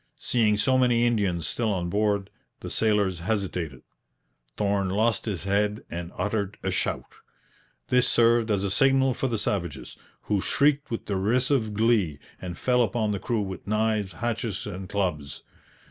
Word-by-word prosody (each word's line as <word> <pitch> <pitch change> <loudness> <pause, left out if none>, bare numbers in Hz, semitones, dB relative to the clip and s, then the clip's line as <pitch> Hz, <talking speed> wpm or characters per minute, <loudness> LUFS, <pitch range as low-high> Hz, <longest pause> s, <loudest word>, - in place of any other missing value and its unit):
Seeing 110 -4 +1
so 130 +5 +2
many 120 -2 +3
Indians 100 -8 0
still 110 +6 -1
on 90 -3 -1
board, 100 0 0 0.3
the - - -6
sailors 105 -5 +1
hesitated. 90 - -3 0.7
Thorn 100 -2 +1
lost 110 +4 +1
his 100 -6 -3
head 105 +2 0
and 85 0 -5
uttered 100 0 -2
a - - 0
shout. - - -2 0.8
This 125 0 +4
served 115 -1 +4
as 100 -2 +1
a 100 - -1
signal 135 +4 +3
for 135 - -1
the 115 -3 -1
savages, 100 -3 -3 0.3
who 100 -2 0
shrieked 145 +3 +2
with 115 - -4
derisive 110 +3 +1
glee 105 -9 +2 0.2
and 90 -2 -6
fell 125 -1 +2
upon 110 -1 0
the 100 - -2
crew 115 +1 -1
with 95 -1 -7
knives, 105 -2 0
hatchets, 115 0 -3
and 95 -2 -6
clubs. 90 -8 -2
105 Hz, 155 wpm, -26 LUFS, 95-115 Hz, 0.8 s, This